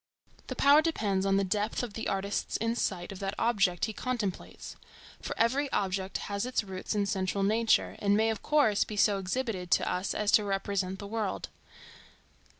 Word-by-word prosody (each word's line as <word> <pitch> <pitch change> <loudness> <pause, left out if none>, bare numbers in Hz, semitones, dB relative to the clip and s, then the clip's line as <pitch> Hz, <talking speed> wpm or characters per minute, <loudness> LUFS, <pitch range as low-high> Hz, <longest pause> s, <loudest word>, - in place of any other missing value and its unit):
The - - -4
power 285 +2 +6
depends 205 - 0
on 195 0 +3
the 195 - +2
depth 210 +5 -1
of 235 -4 -5
the 225 - -4
artist's 195 +1 -2
insight 210 -5 -1
of 195 - -8
that 195 0 -3
object 200 -7 +2
he 220 - -5
contemplates. 220 -6 -4 0.5
For - - -5
every 265 +5 +1
object 190 0 -1
has 200 0 -2
its 250 -2 -1
roots 190 +1 -5
in 205 -1 +1
central 195 0 -1
nature, 220 +3 +2
and 205 0 +2
may 220 +1 +3
of 220 - -5
course 285 -9 +3
be 210 - -7
so 200 -1 +3
exhibited 195 -2 -3
to - - +2
us 180 +2 -1
as 210 -1 +1
to 210 - +5
represent 195 -1 -2
the 200 - -8
world. 210 -2 -3
205 Hz, 180 wpm, -29 LUFS, 195-225 Hz, 0.5 s, power